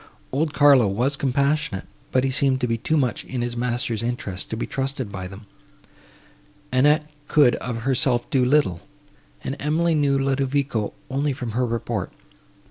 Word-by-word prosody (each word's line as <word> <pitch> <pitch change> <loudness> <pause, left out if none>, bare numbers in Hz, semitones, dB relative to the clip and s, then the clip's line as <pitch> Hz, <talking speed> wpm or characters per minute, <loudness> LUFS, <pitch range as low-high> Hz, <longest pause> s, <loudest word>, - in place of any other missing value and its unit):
Old 150 +3 0
Carlo 140 -5 +6
was 120 +8 0
compassionate, 140 -5 0 0.3
but 130 - +2
he 135 - +1
seemed 130 0 +2
to 125 - +1
be 115 - 0
too 155 +8 0
much 125 -6 0
in 125 -2 -4
his 120 0 -3
master's 120 -2 -1
interest 115 -6 -4
to 110 - -3
be - - -2
trusted 135 -4 -3
by 95 -2 -5
them; 100 +3 -11 1.3
Annette 150 +4 +4 0.2
could 145 -5 +5
of 115 -2 -5
herself 130 -1 +2
do 130 -2 +3
little, 125 - +2 0.6
and 135 - -3
Emily 160 +3 +1
knew 145 -3 +2
Ludovico 135 -4 0 0.2
only 140 +1 0
from 125 -3 -5
her 125 +3 0
report. 115 -1 -3
130 Hz, 160 wpm, -23 LUFS, 120-140 Hz, 1.3 s, Carlo